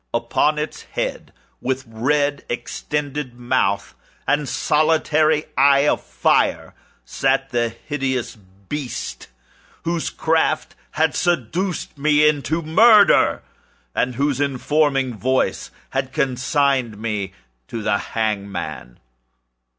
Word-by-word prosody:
Upon 120 +6 +1
its 150 +1 -4
head, - - -4 0.3
with 130 +1 -2
red 140 +5 0
extended 145 +1 -4
mouth 120 -5 0 0.3
and 145 -1 +1
solitary 155 0 +2
eye 140 +1 +5
of - - +2
fire, - - +1 0.3
sat 135 0 0
the 120 -1 +1
hideous 130 +1 -3 0.3
beast 150 -4 -5 0.6
whose 170 -1 -1
craft 160 -1 0 0.2
had 160 0 +2
seduced 175 - -1
me 150 +1 +4
into 155 +2 0
murder, 205 +6 +5 0.5
and 125 0 0
whose 140 +1 0
informing 140 -1 +1
voice 130 +5 0 0.2
had 135 -1 -2
consigned 130 -3 +1
me 105 -3 -3 0.3
to 115 -2 -5
the 105 -1 +1
hangman. 100 - -4
140 Hz, 100 wpm, -21 LUFS, 120-150 Hz, 0.6 s, eye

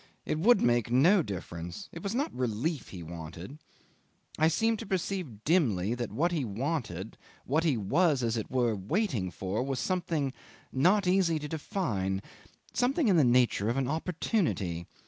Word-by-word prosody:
It 155 - -1
would 220 +5 +5
make 120 -1 +2
no 170 +11 +5
difference; 90 - -6
it 165 - -8
was 200 +4 -3
not 280 +5 -1
relief 125 +4 -2
he 90 -3 -8
wanted; 85 - -8 0.8
I 160 - +5
seemed 225 +6 +1
to - - -5
perceive 180 - -3
dimly 120 - +2
that 120 -1 -4
what 170 +4 +1
he 160 -5 0
wanted, 110 - -3 0.3
what 155 +5 +1
he 150 -7 +2
was, 140 - +2
as 115 -1 0
it 110 - -3
were, 120 -4 +1
waiting 110 - -1
for, 95 +5 -3
was 135 0 -2
something 165 -7 -1 0.4
not 185 +9 +3
easy 180 -3 +3
to 150 -1 -5
define 105 - -2 0.5
something 255 +1 +2
in 190 - +5
the 155 - +6
nature 120 -4 +3
of 120 - 0
an 135 -2 0
opportunity. 155 - -1
135 Hz, 165 wpm, -30 LUFS, 105-175 Hz, 0.8 s, the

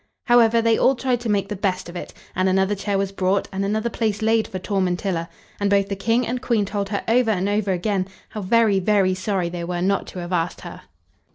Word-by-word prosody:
However, 230 -1 +4
they 230 -1 +3
all 270 - +4
tried 250 -1 0
to 235 -1 -4
make 200 -1 +1
the 210 - -3
best 185 -2 -2
of 175 - -10
it, 175 - -6 0.2
and 185 +1 +2
another 190 +2 +2
chair 200 0 -1
was 195 0 -1
brought, 195 0 0
and 195 0 -2
another 215 +3 0
place 220 -2 -1
laid 225 0 +2
for 185 - -5
Tormentilla; 185 -2 -1 0.3
and 200 -1 +1
both 200 0 +2
the 200 - -2
King 230 +5 +1
and 245 +2 -3
Queen 230 -5 +1
told 200 0 -3
her 200 -1 -2
over 235 +1 +3
and 195 -2 +1
over 205 -1 0
again 185 +1 -1 0.2
how 215 - -6
very, 210 0 +3
very 190 -1 +2
sorry 185 -1 -1
they 170 0 -5
were 175 0 -3
not 195 +1 0
to - - -9
have 175 +1 -5
asked 165 -1 -1
her. - - -9
200 Hz, 235 wpm, -22 LUFS, 185-220 Hz, 0.3 s, However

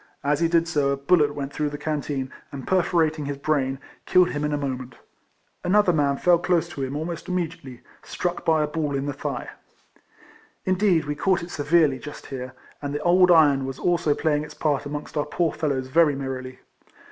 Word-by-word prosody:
As 145 +1 +1
he 170 - +3
did 165 0 +2
so 145 -5 +1
a 140 - 0
bullet 145 +1 +2
went 140 -1 -5
through 150 -1 -1
the 145 - -6
can 150 0 -2
teen, 135 -2 -4 0.2
and 135 -2 -7
perforating 165 -4 +1
his 140 0 -4
brain, 140 -2 0 0.3
killed 180 -1 +4
him 145 0 -3
in 150 - 0
a 145 - 0
moment. 130 -3 -4 0.7
Another 185 0 +3
man 140 -3 +1
fell 175 +2 +4
close 175 -1 +1
to 145 - -7
him 135 +1 -3
almost 165 +2 -4
immediately, 165 -8 -4 0.2
struck 180 0 -3
by 160 -1 +3
a - - -1
ball 150 -2 -2
in 135 0 -2
tlie 145 - -2
thigh. 140 -3 -4 1.2
Indeed 185 -3 +2
we 150 - -2
caught 185 +3 +1
it 175 - -8
severely 145 -2 +2
just 145 +3 -9
here, 130 -1 -6 0.3
and 145 0 -4
the 145 - -2
old 180 +1 +5
iron 150 -5 +5
was 135 - -5
also 170 -4 +1
playing 150 -2 0
its - - -10
part 145 -2 0
amongst 150 +2 -6
our 145 - +1
poor 170 -2 0
fellows 140 -4 -1
very 150 0 +4
merrily. 130 -1 -6
150 Hz, 200 wpm, -24 LUFS, 140-170 Hz, 1.2 s, old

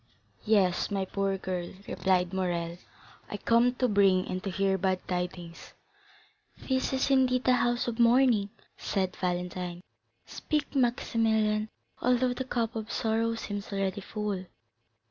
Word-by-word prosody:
"Yes, 200 -5 +3
my 195 -2 -1
poor 195 0 -1
girl," 180 -2 -4
replied 185 -1 +1
Morrel; 175 -2 -2 0.5
"I 205 - -4
come 235 +3 +3
to 250 - +1
bring 195 -4 +3
and 185 0 -4
to 195 - -2
hear 195 +1 +1
bad 190 -1 -1
tidings." 180 -2 -5 0.8
"This 260 -1 -1
is, 265 +1 0
indeed, 255 -1 +3
a 255 - +6
house 240 0 +1
of 235 0 -3
mourning," 235 -3 +4 0.3
said 190 -2 -1
Valentine; 180 0 -3 0.4
"speak, 300 -1 -3
Maximilian, 220 -4 +1 0.3
although 250 0 +2
the 260 +1 -4
cup 235 -3 -2
of 220 0 -5
sorrow 225 +1 0
seems 205 -2 -5
already 195 0 -1
full." 205 -2 -4
205 Hz, 135 wpm, -29 LUFS, 185-235 Hz, 0.8 s, a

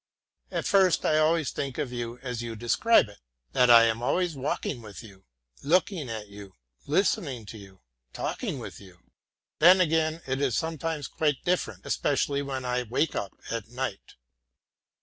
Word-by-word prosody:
At - - -3
first 190 -4 +3
I 155 - +3
always 160 -1 +2
think 135 -3 -4
of 130 - -2
you 120 0 -4
as 125 -3 -4
you 115 -1 -5
describe 120 - +3
it 100 -1 -15 0.3
that 125 -1 +3
I 115 -1 +9
am 115 0 +1
walking 140 -2 -1
with 105 0 -10
you, 95 -3 -15 0.4
looking 165 - +1
at 110 -2 -5
you, 100 -1 -12 0.3
listening 145 - 0
to 110 +2 -9
you, 95 -1 -15 0.3
talking - - -3
with - - -8
you. 95 -3 -15 0.6
Then 180 +4 +7
again 160 -1 +1
it 135 +1 -2
is 130 -6 +1
sometimes 160 -2 -3
quite 150 -4 -1
different, 110 - -1
especially 140 0 0
when 135 -2 -4
I 125 0 0
wake 125 +7 -1
up 100 - -3 0.2
at 115 -2 -3
night. 125 -3 -5
130 Hz, 160 wpm, -27 LUFS, 115-160 Hz, 0.6 s, I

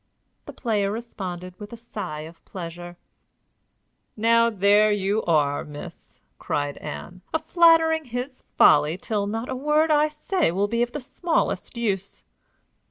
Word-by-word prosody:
The - - -8
player 210 -5 0
responded 185 -6 -6
with 210 -1 -9
a 235 - -8
sigh 205 -10 -6
of 165 +2 -12
pleasure. 175 -1 -8 1.2
"Now 230 +1 +4
there 205 0 +4
you 205 +1 0
are, 145 -4 +2
miss," 145 -1 -11 0.2
cried 145 0 -2
Ann, 170 - -8
"a - - +6
flattering 320 -1 +4
of - - -19
his 250 +2 -5 0.2
folly 155 +4 +5
till 205 +1 -2
not 225 +4 -3
a 260 - -3
word 300 +4 +2
I 300 0 +4
say 305 - 0
will 195 +4 0
be 235 +3 -1
of 240 0 -1
the 295 - -3
smallest 320 -2 -2
use!" 200 -4 -3
215 Hz, 150 wpm, -24 LUFS, 180-255 Hz, 1.2 s, a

